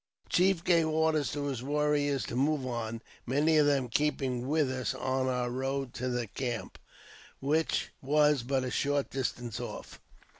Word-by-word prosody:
The - - -30
chief 180 -1 +3
gave 170 -3 +4
orders 155 -3 +1
to 145 0 -2
his 135 -4 -3
warriors 145 0 +1
to - - -5
move 140 +1 +1
on, 115 -2 -4 0.2
many 150 +5 +3
of 150 -1 +5
them 140 -3 +2
keeping 130 -2 0
with 150 -2 +2
us 130 -1 -2
on 130 0 -1
our 125 -1 0
road 135 +1 -2
to 130 +1 -3
their 125 -1 -1
camp, 120 +2 -4 0.6
which 155 +4 0
was 150 0 +3
but 130 +2 0
a 125 - -3
short 145 +1 0
distance 120 -3 -3
off. - - -7
135 Hz, 165 wpm, -30 LUFS, 125-150 Hz, 0.6 s, of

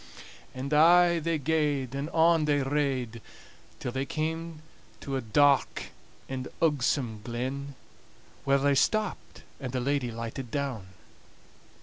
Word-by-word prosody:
And 135 +3 -4
aye 170 +2 +6
they 165 0 0
gaed, 145 -3 0
and 140 +3 -3
on 165 -1 +4
they 145 -2 +2
rade, 135 -5 -1 0.6
till 125 - -4
they 130 +2 -2
came 160 0 -3 0.4
to 135 -2 -4
a 135 - -1
dark 140 +4 +2 0.4
and 130 -1 -4
ugsome 130 -7 +1
glen, 130 +4 -4 0.7
where 140 0 +3
they 140 +1 +2
stopped, 215 +9 0 0.2
and 130 -3 -5
the 130 - 0
lady 135 -1 0
lighted 115 +2 -6
down. 130 -8 -3
140 Hz, 125 wpm, -28 LUFS, 130-155 Hz, 0.7 s, aye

